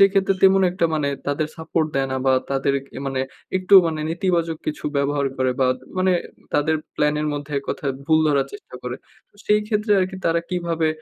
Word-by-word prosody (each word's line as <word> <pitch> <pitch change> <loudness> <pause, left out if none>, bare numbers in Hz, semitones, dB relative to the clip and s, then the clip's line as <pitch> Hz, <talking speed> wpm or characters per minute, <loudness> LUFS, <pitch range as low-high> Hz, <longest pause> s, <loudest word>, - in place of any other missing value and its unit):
সেক্ষেত্রে 195 0 +4
তেমন 195 0 +6
একটা 180 -1 -1
মানে 150 -2 0 0.2
তাদের 145 +2 0
সাপোর্ট 160 0 -1
দেয় 135 -1 +1
না - - 0
বা, 130 - +5 0.2
তাদের 135 0 +1 0.2
এ - - -4
মানে 135 -1 -1 0.4
একটু 185 +2 +3
মানে 160 -1 -2
নেতিবাচক 170 -2 0
কিছু 150 - -4
ব্যবহার 140 0 +1
করে 130 0 +1
বা, 130 - +4
তা - - -19
মানে 185 0 +3 0.4
তাদের 150 +2 +2 0.2
প্ল্যানের 150 +1 +1
মধ্যে 145 0 -5
এককথায় 140 0 -3
ভুল 160 -1 +4
ধরার 140 -2 +2
চেষ্টা 205 - -12
করে। 125 0 -4 0.3
তো - - -28
সেইক্ষেত্রে 210 0 +2
আরকি 185 +1 -2
তারা 170 0 +2
কিভাবে 170 -3 0
160 Hz, 185 wpm, -22 LUFS, 140-185 Hz, 0.4 s, তেমন